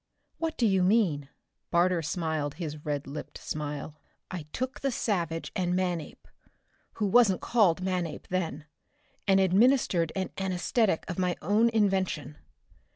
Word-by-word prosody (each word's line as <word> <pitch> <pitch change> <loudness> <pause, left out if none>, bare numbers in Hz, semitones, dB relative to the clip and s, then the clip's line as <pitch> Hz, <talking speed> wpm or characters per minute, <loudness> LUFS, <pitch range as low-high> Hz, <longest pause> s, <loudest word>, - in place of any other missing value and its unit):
"What 325 -1 -2
do 240 - +2
you 190 -3 +3
mean?" 180 -8 +2 0.4
Barter 175 0 +3
smiled 155 -3 -2
his 155 -3 -6
red 145 -2 -2
lipped 145 +2 -7
smile. 150 0 -5 0.3
"I 170 -5 -5
took 255 0 -3
the 275 - 0
savage 170 - -2
and 180 -1 0
Manape, 180 -4 -3 0.7
who 215 - -1
wasn't 200 -2 +5
called 185 -7 +3
Manape 180 -4 -2
then, 165 -5 -2 0.6
and 195 -1 +5
administered 190 - +3
an 190 -1 -2
anesthetic 190 +1 0
of 180 -1 -4
my 180 -1 +1
own 210 +7 +4
invention. 190 -9 0
180 Hz, 135 wpm, -28 LUFS, 160-200 Hz, 0.7 s, wasn't